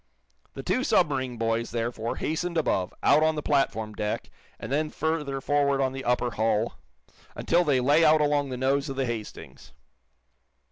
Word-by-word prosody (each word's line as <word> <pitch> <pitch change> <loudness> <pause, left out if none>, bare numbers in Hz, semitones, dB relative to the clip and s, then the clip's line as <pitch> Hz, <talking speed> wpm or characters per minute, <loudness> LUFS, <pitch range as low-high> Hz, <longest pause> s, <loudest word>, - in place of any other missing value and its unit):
The - - -6
two 255 - 0
submarine 140 - +1
boys, 115 +1 -1
therefore, 115 -1 -3
hastened 170 +2 -2
above, 95 - 0
out 150 - +5
on 160 0 +2
the 150 - -4
platform 110 -7 0
deck, 105 0 -4 0.3
and - - -7
then 155 +2 0
further 150 -4 -2
forward 140 0 +1
on 130 -1 0
the 135 0 -6
upper 125 0 +1
hull, 110 +1 0 0.6
until 175 +1 +2
they 145 -6 +2
lay 145 +6 +4
out 155 0 +5
along 145 -1 +1
the 130 - -4
nose 135 +2 0
of 135 - -4
the 135 0 0
"Hastings." 115 -3 -7
135 Hz, 170 wpm, -26 LUFS, 120-150 Hz, 0.6 s, out